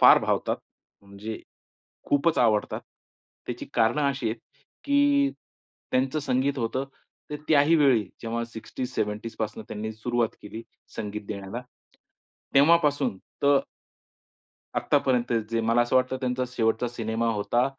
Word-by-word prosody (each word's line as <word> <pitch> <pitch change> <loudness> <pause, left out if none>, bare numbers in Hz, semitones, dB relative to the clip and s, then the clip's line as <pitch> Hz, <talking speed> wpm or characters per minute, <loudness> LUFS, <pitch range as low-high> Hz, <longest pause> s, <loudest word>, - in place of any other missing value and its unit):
फार - - +9
भावतात. - - 0 0.5
म्हणजे 100 +2 -7 0.7
खूपच 150 +3 +2
आवडतात. 110 -4 +2 0.7
त्याची 125 -1 -4
कारणं 115 +6 +3
अशी 135 -4 -2
आहेत, 115 +1 -4 0.4
की 285 0 +4 0.6
त्यांचं 130 +4 +1
संगीत 135 0 0
होतं, 120 +3 -1 0.5
तर 150 - -3
त्याही 155 +1 +5
वेळी 135 -8 +5 0.2
जेव्हा 115 0 -2
60s, 120 +2 -6
70s 105 +2 -2
पासूनं 110 0 -3
त्यांनी 110 +1 -4
सुरुवात 120 +1 -1
केली 110 +2 -7 0.3
संगीत 105 0 -4
देण्याला. 100 +3 -5 0.9
तेव्हापासून 145 - +4 0.3
तर 140 -1 +6 1.2
आत्तापर्यंत 125 -2 +2 0.2
जे 115 0 +1
मला 115 +1 +3
असं 120 - +1
वाटतं 130 0 +2
त्यांचा 125 0 0
शेवटचा 115 -1 +1
सिनेमा 115 -1 -2
होता 115 +3 +1
120 Hz, 120 wpm, -26 LUFS, 110-135 Hz, 1.2 s, फार